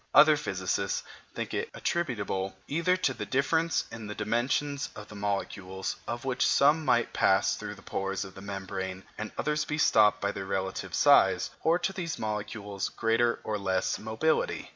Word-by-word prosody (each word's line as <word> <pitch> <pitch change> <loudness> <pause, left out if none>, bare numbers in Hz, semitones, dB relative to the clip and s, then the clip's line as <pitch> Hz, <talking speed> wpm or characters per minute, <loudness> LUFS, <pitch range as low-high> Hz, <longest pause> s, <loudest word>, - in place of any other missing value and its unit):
Other 150 +1 +8
physicists 95 - -1 0.3
think - - -4
it - - -2
attributable, 100 - -2
either 170 +5 +2
to 185 - +1
the - - -5
difference 160 +4 +1
in 115 -2 -7
the 105 - -5
dimensions 130 +6 0
of 105 - -9
the 105 - -10
molecules, 95 -2 -3
of 120 +3 -4
which 130 -2 0
some 150 +3 +4
might 120 -4 +2
pass 95 0 +3
through - - -6
the - - -16
pores 95 0 -2
of 95 - -11
the 95 - -11
membrane 95 -1 -5
and 110 0 -5
others 150 0 0
be 150 - -3
stopped 105 -8 +5
by 100 0 0
their 100 -1 -5
relative 95 -1 -3
size, - - +5
or 165 +2 +3
to 180 +2 -2
these 170 -5 -3
molecules' 105 -2 -3
greater 115 +1 +1
or 105 -1 -2
less 95 -1 0
mobility. 110 +9 0
110 Hz, 170 wpm, -29 LUFS, 100-145 Hz, 0.3 s, Other